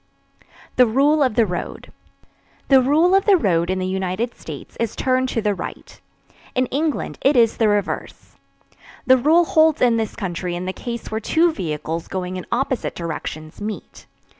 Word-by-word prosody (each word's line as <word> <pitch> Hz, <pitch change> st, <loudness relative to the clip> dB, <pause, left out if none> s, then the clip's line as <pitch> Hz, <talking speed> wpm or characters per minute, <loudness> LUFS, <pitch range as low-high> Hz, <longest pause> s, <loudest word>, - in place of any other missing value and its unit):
THE 250 Hz, -1 st, +6 dB
RULE 285 Hz, +6 st, +3 dB
OF 255 Hz, -6 st, +2 dB
THE 230 Hz, -1 st, +4 dB
ROAD. 175 Hz, -3 st, -6 dB, 0.8 s
The 270 Hz, -2 st, +7 dB
"rule 310 Hz, +8 st, +3 dB
of 390 Hz, 0 st, +4 dB
the 405 Hz, -3 st, +6 dB
road" 175 Hz, -, +1 dB
in 190 Hz, -, 0 dB
the 185 Hz, -, -2 dB
United 190 Hz, +5 st, -2 dB
States -, -, -10 dB
is 230 Hz, -2 st, -2 dB
"turn 260 Hz, 0 st, +1 dB
to 225 Hz, -3 st, -2 dB
the 210 Hz, -1 st, +2 dB
right"; 180 Hz, -, -8 dB, 0.5 s
in 255 Hz, 0 st, +2 dB
England 300 Hz, +2 st, -2 dB
it 275 Hz, +2 st, +3 dB
is 230 Hz, -2 st, +4 dB
the 225 Hz, -, +3 dB
reverse. 205 Hz, -2 st, -3 dB, 0.7 s
The 260 Hz, 0 st, +6 dB
rule 320 Hz, +7 st, +4 dB
holds 315 Hz, -1 st, +3 dB
in 240 Hz, -2 st, +3 dB
this 220 Hz, -2 st, -2 dB
country 175 Hz, -1 st, -4 dB
in 180 Hz, +1 st, -4 dB
the 185 Hz, -, -3 dB
case 235 Hz, +1 st, -6 dB
where 220 Hz, -, -1 dB
two 325 Hz, +8 st, +2 dB
vehicles 160 Hz, -, -4 dB
going 185 Hz, -1 st, -4 dB
in 185 Hz, -, -7 dB
opposite 260 Hz, +1 st, -1 dB
directions 155 Hz, 0 st, -6 dB
meet. 210 Hz, 0 st, -7 dB
230 Hz, 175 wpm, -21 LUFS, 185-270 Hz, 0.8 s, The